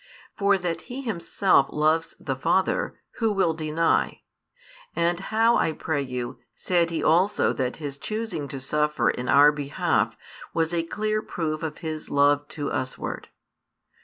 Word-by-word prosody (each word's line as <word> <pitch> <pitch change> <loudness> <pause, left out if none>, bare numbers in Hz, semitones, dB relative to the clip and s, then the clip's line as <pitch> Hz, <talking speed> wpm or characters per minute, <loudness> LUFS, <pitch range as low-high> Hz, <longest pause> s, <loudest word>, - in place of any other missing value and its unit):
For 200 -1 +3
that 175 -2 -3
He 260 +3 -5
Himself 190 - +2
loves 155 +2 +1
the 135 - -3
Father, 190 - 0 0.2
who 225 -2 +1
will 190 -5 +2
deny? 160 +1 0 0.7
And 170 +1 +1
how, 225 +4 +3
I 160 - +1
pray 155 -2 -2
you, 125 -2 -5 0.2
said 170 -2 +1
He 165 - -2
also 185 +6 +3
that 125 -1 -2
His 145 -3 -6
choosing 215 -9 -3
to 135 -1 -6
suffer 150 +3 +1
in 125 0 -5
our 145 +1 +7
behalf 145 -1 0 0.4
was 165 +1 +1
a 170 - +2
clear 215 +5 -1
proof 155 -5 -3
of 160 -2 -4
His 155 -1 -4
love 145 +1 +3
to 145 -2 -4
us 130 0 -2
ward? - - -5
160 Hz, 155 wpm, -25 LUFS, 145-190 Hz, 0.7 s, our